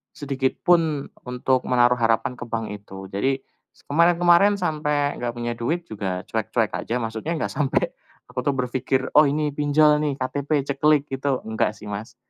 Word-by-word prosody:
sedikit 135 -2 -1
pun 160 -5 +2 0.2
untuk 125 +1 0
menaruh 125 0 +3
harapan 115 +2 +1
ke - - -5
bank 115 -1 -2
itu. 95 -2 -9
Jadi 130 +7 0 0.4
s - - -24
kemarin-kemarin 175 +5 +4
sampai 150 -5 -1
enggak 120 -1 -3
punya 120 0 -3
duit 155 +10 -2
juga 95 - -4
cuek-cuek 110 0 -1
aja, 115 - -3
maksudnya 115 +7 -3
enggak 155 - -2
sampe 145 -3 0 0.3
aku 125 0 -6
tuh 140 +1 0
berpikir, 130 +1 -1
"Oh 150 0 +7
ini 150 +1 0
pinjol 150 +1 +4
nih 145 -2 0
KTP, 140 +2 -1
ceklik," 145 +1 +3
gitu, 135 -1 -1
enggak 110 -1 -1
sih - - -12
Mas. 105 +3 -6
135 Hz, 165 wpm, -23 LUFS, 115-150 Hz, 0.4 s, Oh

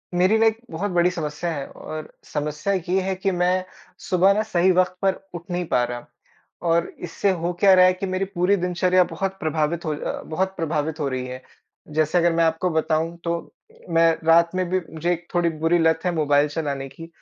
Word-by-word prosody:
मेरी 185 +5 +4
लाइक 225 0 +3
बहुत 190 +5 -3
बड़ी 175 0 +3
समस्या 155 0 -3
है 140 -4 -4
और 155 0 -8
समस्या 150 +6 -2
ये 185 0 0
है 190 +1 -1
कि 195 +1 -1
मैं 180 +1 +1 0.5
सुबह 185 +2 +5
ना 210 - +1
सही 185 -4 +2
वक़्त 185 0 +2
पर 195 -1 +3 0.2
उठ 175 -1 -6
नहीं 175 0 -1
पा 125 - +2
रहा। 120 0 -5 0.6
और 170 +1 +2 0.2
इससे 200 +4 0
हो 175 -1 -2
क्या 195 -2 +6
रहा 185 0 +7
है 185 - +5
कि 185 +2 -4
मेरी 185 +1 -1
पूरी 180 +3 +3
दिनचर्या 180 0 +2
बहुत 190 +3 -4
प्रभावित 160 +1 -1
हो 155 - 0 0.4
बहुत 190 +4 -1
प्रभावित 160 -1 -2
हो 145 - 0
रही 130 -1 -3
है। 130 0 -7 0.6
जैसे 155 +2 +2
अगर 170 -1 +3
मैं 165 0 +2
आपको 165 +3 +1
बताऊँ 160 +1 0
तो 170 - 0 0.6
मैं 165 0 +4 0.2
रात 170 +1 +5
में 185 -1 0
भी 185 - +1
मुझे 170 +3 0 0.2
थोड़ी 175 -1 +2
बुरी 170 +2 +4
लत 160 0 +3
है 180 - +2
मोबाइल 145 -1 +3
चलाने 140 -3 -3
की। 165 +5 -11
170 Hz, 200 wpm, -23 LUFS, 160-185 Hz, 0.6 s, रहा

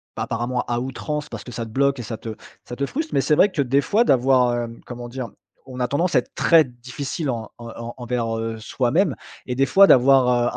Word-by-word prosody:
apparemment 120 +2 -2
à 120 0 -1
outrance 145 +4 -4
parce - - -7
que 125 - -10
ça 115 -1 -4
te 110 - -11
bloque 140 +3 +1
et - - -4
ça 110 0 -6
te 110 -1 -7 0.3
ça 120 - -7
te 140 - -1
frustre. 315 - -4
Mais 135 - +3
c'est 145 +3 +2
vrai 200 +6 +4
que 150 - 0
des 135 +2 +2
fois, 210 - +2
d'avoir, 125 - +3
hem, 115 -1 -5
comment 120 -1 -7
dire? 125 0 -6 0.4
On 130 -1 -9
a 125 - +1
tendance 170 +5 0
à 130 - +5
être 120 - -10
très 165 -2 +5
difficile 130 +5 -5
en, 115 -3 -2 0.2
heu, - - -8
en 115 0 -6
envers, 120 -2 -2
heu, 115 0 -3
soi-même 130 - 0 0.3
et 125 - -3
des 135 - +3
fois, 195 +6 +6
d'avoir, 125 -2 +5
125 Hz, 235 wpm, -22 LUFS, 120-140 Hz, 0.4 s, fois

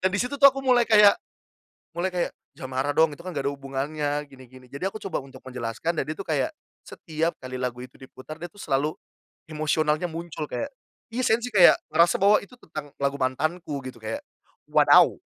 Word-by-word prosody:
Dan 190 - +3
di - - -2
situ, 250 +6 -1
tuh, 280 - +10
aku 270 0 -3
mulai 250 -2 +5
kayak 210 -2 +8 0.8
mulai 180 +2 -3
kayak, 175 - 0 0.2
"Jangan 130 -1 -8
marah 145 +2 +1
dong 160 0 +4
itu, 145 - -11
kan, 180 - -5
nggak 140 - -1
ada - - -5
hubungannya." 145 +2 -3
Gini-gini. 130 -1 -15
Jadi 140 +7 -4
aku 205 +2 -5
coba 195 - -2
untuk 135 -2 -11
menjelaskan 130 +6 -4
dan - - 0
dia, 155 - -3
tuh, - - -6
kayak, - - 0 0.3
setiap 165 +1 -3
kali 130 0 -6
lagu 125 -1 -3
itu 125 0 -13
diputar 130 +4 -11
dia, 175 - -5
tuh, 200 +3 -16
selalu 145 +3 0 0.6
emosionalnya 155 +1 0
muncul 165 -2 -6
kayak 280 - -4 0.4
iya 250 +2 -2
sensi 235 +2 +2
kayak 190 -6 +7 0.2
ngerasa 170 +4 +4
bahwa 205 +1 +7
itu 200 - -21
tentang 155 -3 -8
lagu 140 0 +1
mantanku 145 +3 -2
gitu 130 -1 -8
kayak 110 0 -4 0.5
wadaw. - - +6
155 Hz, 195 wpm, -25 LUFS, 135-180 Hz, 0.8 s, tuh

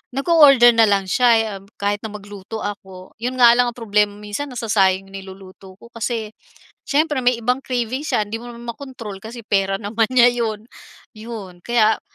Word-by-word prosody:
nag-o-order 275 -4 +6
na 225 - +7
lang 200 -1 +1
siya'y 235 +1 +4 0.2
em - - -19 0.2
kahit 205 0 0
na 220 - -4
magluto 205 +1 -8
ako. 190 -2 -8
Yun 250 +3 -3
nga 240 -1 +9
lang 245 - +4
ang 240 - -9
problema 210 -3 +1
minsan 210 +7 -5
nasasayang 195 -5 0
niluluto 190 0 -12
ko 235 - -14
kasi 230 -1 -3 0.6
siyempre 295 -1 +1
may 250 -1 +3
ibang 250 +3 0
craving 250 0 -2
siya 215 -8 0
hindi 225 +2 -5
mo 240 - -10
naman 235 0 -11
makontrol 230 -7 -9
kasi 230 +1 -9
pera 195 -1 +1
naman 220 +1 -1
niya 245 -1 +6
'yon, 225 -3 -2 0.6
'yon 215 -5 -9
kaya 225 -2 +2
225 Hz, 175 wpm, -20 LUFS, 205-245 Hz, 0.6 s, nga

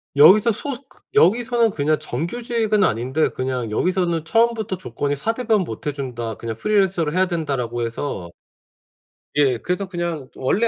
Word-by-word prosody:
여기서 190 +11 +7
소 275 +6 -2
그 - - -24
여기서는 235 +4 +3
그냥 155 -2 +1
정규직은 215 - -1
아닌데 130 +1 +1
그냥 130 -3 -3
여기서는 170 - 0
처음부터 225 0 +1
조건이 145 -5 -3
"4 220 +11 -1
대보험 225 -4 +1
못 115 -3 -7
해준다. 125 -6 -4
그냥 115 +1 -5
프리랜서를 190 - +1
해야 185 +1 +2
된다."라고 135 -9 -2
해서 115 -7 -4 1.1
예. 135 -4 +3
그래서 180 - -2
그냥 170 -6 -4
원래 205 - +1
165 Hz, 345 characters per minute, -21 LUFS, 130-210 Hz, 1.1 s, 여기서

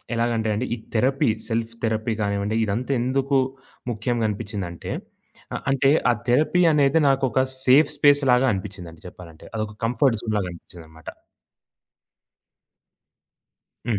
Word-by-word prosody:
ఎలాగంటే 115 -1 0
అండి, 115 +5 -2
ఈ - - -5 0.2
థెరపీ 135 +5 +2 0.2
సెల్ఫ్ 115 0 -2
థెరపీ 110 0 -1
గానివ్వండి 100 +1 -1
ఇదంతా 115 +6 -2
ఎందుకు 135 +2 +1 0.5
ముఖ్యంగా 115 +1 -1
అనిపిచ్చిందంటే 100 -5 -5 0.8
అంటే 135 0 +3 0.2
ఆ - - +5 0.2
థెరపీ 155 +8 +3
అనేది 145 +1 +3
నాకొక 135 -1 +2 0.2
సేఫ్ 140 +4 +5
స్పేస్‌లాగా 140 -3 +4
అనిపిచ్చిందండి 95 -4 -7
చెప్పాలంటే 85 -3 -14
అదొక 110 -1 -4
కంఫర్ట్ 120 0 +2
జోన్‌లాగా 105 -5 -1
అనిపిచ్చిందన్నమాట. 80 -2 -14 2.8
హ్మ్. 110 -4 +1
115 Hz, 105 wpm, -23 LUFS, 100-135 Hz, 2.8 s, ఆ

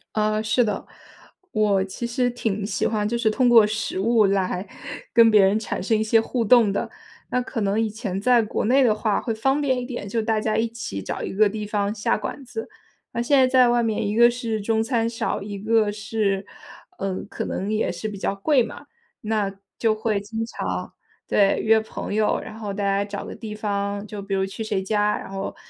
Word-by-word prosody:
呃， 215 0 +1
是 225 +3 +2
的。 210 -3 -2 0.7
我 205 -3 +2
其 195 +5 -6
实 245 +1 0
挺 220 -4 -2
喜 205 - -1
欢 210 -2 0
就 235 +2 -1
是 230 -2 +2
通 250 +2 +3
过 230 -3 +8
食 215 -2 -3
物 225 +1 +4
来 190 -1 -1 0.5
跟 230 -1 +7
别 210 -2 +6
人 195 +2 +3
产 220 - -4
生 220 +3 +1
一 215 - +1
些 225 +1 +4
互 230 0 -2
动 225 -2 +5
的， 200 - -2 0.4
那 250 - +1
可 245 -2 -4
能 200 +1 +1
以 220 - 0
前 205 -3 -4
在 245 +1 +5
国 210 - -2
内 265 +5 +4
的 230 -4 +4
话 215 -1 0
会 230 - -2
方 270 +6 +1
便 270 -3 +1
一 - - -4
点， 240 -5 -6
就 225 +3 -1
大 220 0 0
家 215 0 -1
一 230 +1 +1
起 225 - -6
找 - - -5
一 - - -4
个 210 +1 +4
地 215 0 -5
方 205 0 -1
下 210 -1 0
馆 215 +6 -6
子。 225 -2 -6 0.4
那 235 - -1
现 275 +4 +3
在 260 -1 +5
在 255 -1 +5
外 240 0 +3
面， 220 -2 -1
一 205 - -2
个 235 +1 +7
是 235 -3 -3
中 220 +2 +1
餐 230 -1 0
少， 230 - -2
一 200 0 -6
个 220 +1 +2
是， 205 -1 -1 0.5
嗯， 190 -1 -3
可 - - -5
能 195 +3 -3
也 215 - 0
是 175 +4 -5
比 210 -2 -6
较 195 - -1
贵 260 +7 +3
嘛。 230 - -9 0.4
那 210 -2 -1 0.3
就 220 -2 +2
会 215 -1 0
经 225 +2 -4
常 - - -4 0.3
对， 200 -1 +3
约 220 0 +5
朋 220 - -6
友， 215 0 +2
然 220 - -9
后 210 -2 -4
大 200 +1 -3
家 200 0 +1
找 200 - -6
个 - - -7
地 215 -2 -7
方， 200 -1 -2
就 210 -1 -7
比 195 0 -3
如 190 0 +1
去 210 +3 -6
谁 205 -3 -1
家， 210 +1 +1
然 - - -8
后 195 0 -4
215 Hz, 240 characters per minute, -23 LUFS, 200-230 Hz, 0.7 s, 过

